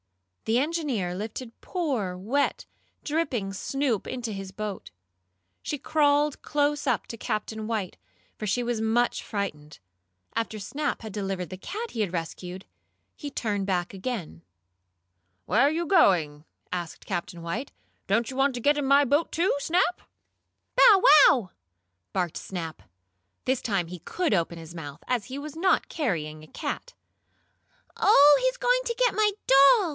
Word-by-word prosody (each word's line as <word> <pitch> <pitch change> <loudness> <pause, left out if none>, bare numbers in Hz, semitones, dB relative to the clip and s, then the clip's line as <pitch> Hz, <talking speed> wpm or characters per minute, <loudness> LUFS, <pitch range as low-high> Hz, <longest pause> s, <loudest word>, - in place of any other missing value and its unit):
The 225 +2 +2
engineer 275 - -1
lifted 225 +4 -7
poor, 255 - -2
wet, 235 +10 0 0.4
dripping 275 -11 -1
Snoop 260 +1 -1
into 240 -4 -4
his 195 -1 -6
boat. 210 -1 -6 0.7
She 295 - -3
crawled 290 0 +2
close 290 0 0
up - - +1
to 230 - -7
Captain 215 -1 -3
White, 215 -5 -2 0.4
for 215 - -4
she 245 +5 +1
was 235 -2 -1
much 230 +2 +1
frightened. 150 -8 -5 0.6
After 225 -1 -2
Snap 285 +6 -3
had 220 -3 -7
delivered 195 -3 -3
the 185 - -6
cat 440 - -5
he 225 - -2
had 200 -5 -1
rescued, 180 +2 -5 0.5
he 290 - -6
turned 205 -7 -2
back 180 -1 -1
again. 190 - -5 1.0
"Where 210 +8 +2
are 280 - +6
you 335 +2 -1
going?" 170 - +3 0.3
asked 175 -2 -5
Captain 175 -2 -4
White. 220 +11 -4 0.4
"Don't 225 +4 +1
you - - -8
want 270 0 +2
to - - -3
get 290 +4 +3
in 285 - -1
my 280 +1 +5
boat, 290 +5 +1
too, 345 +2 +1
Snap?" 355 +4 +1 0.7
"Bow 415 -6 +7 0.3
wow!" 240 - +1 0.6
barked 180 -4 -1
Snap. 165 -4 -6 0.6
This 260 -1 +1
time 195 -6 -1
he 180 +1 -8
could 350 - -1
open 170 -2 0
his 165 +1 -10
mouth, 145 -2 -8
as 245 -4 0
he 265 - -6
was 295 +1 -7
not 370 +3 +2
carrying 155 - -3
a - - -13
cat. - - -5 1.0
"Oh, 295 - +7
he's - - +1
going - - +2
to 470 - -1
get - - +3
my 430 -1 +3 0.2
doll!" 280 - +6
230 Hz, 155 wpm, -27 LUFS, 185-290 Hz, 1.0 s, Bow